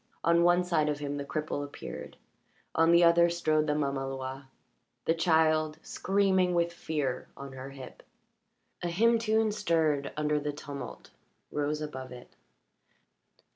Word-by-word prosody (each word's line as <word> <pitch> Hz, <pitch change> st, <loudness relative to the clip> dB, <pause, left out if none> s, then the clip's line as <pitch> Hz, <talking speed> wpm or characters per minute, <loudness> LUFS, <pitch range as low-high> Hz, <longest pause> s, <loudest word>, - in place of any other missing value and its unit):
On 170 Hz, 0 st, +4 dB
one 175 Hz, +1 st, +4 dB
side 160 Hz, -4 st, +1 dB
of 150 Hz, -, -1 dB
him 145 Hz, -1 st, -4 dB
the 140 Hz, -, -3 dB
cripple 150 Hz, 0 st, -3 dB
appeared; 145 Hz, -, -8 dB, 0.6 s
on 165 Hz, +1 st, +4 dB
the 170 Hz, +1 st, +6 dB
other 170 Hz, 0 st, +6 dB
strode 155 Hz, -3 st, +1 dB
the 150 Hz, -, +1 dB
mamaloi 135 Hz, -1 st, -3 dB, 0.6 s
the 165 Hz, -, +3 dB
child, 160 Hz, -2 st, +2 dB
screaming 190 Hz, -2 st, +1 dB
with 170 Hz, 0 st, +1 dB
fear, 150 Hz, -6 st, -3 dB
on 140 Hz, 0 st, -8 dB
her 130 Hz, +1 st, -7 dB
hip. 135 Hz, -2 st, -11 dB, 0.8 s
A 175 Hz, -, -1 dB
hymn 230 Hz, +7 st, +3 dB
tune 220 Hz, -1 st, +2 dB
stirred 160 Hz, -8 st, +1 dB
under 150 Hz, 0 st, +1 dB
the 145 Hz, 0 st, -3 dB
tumult 145 Hz, -1 st, -8 dB, 0.4 s
rose 150 Hz, +1 st, -1 dB
above 130 Hz, -4 st, -6 dB
it. 125 Hz, -1 st, -12 dB
155 Hz, 140 wpm, -30 LUFS, 145-170 Hz, 0.8 s, the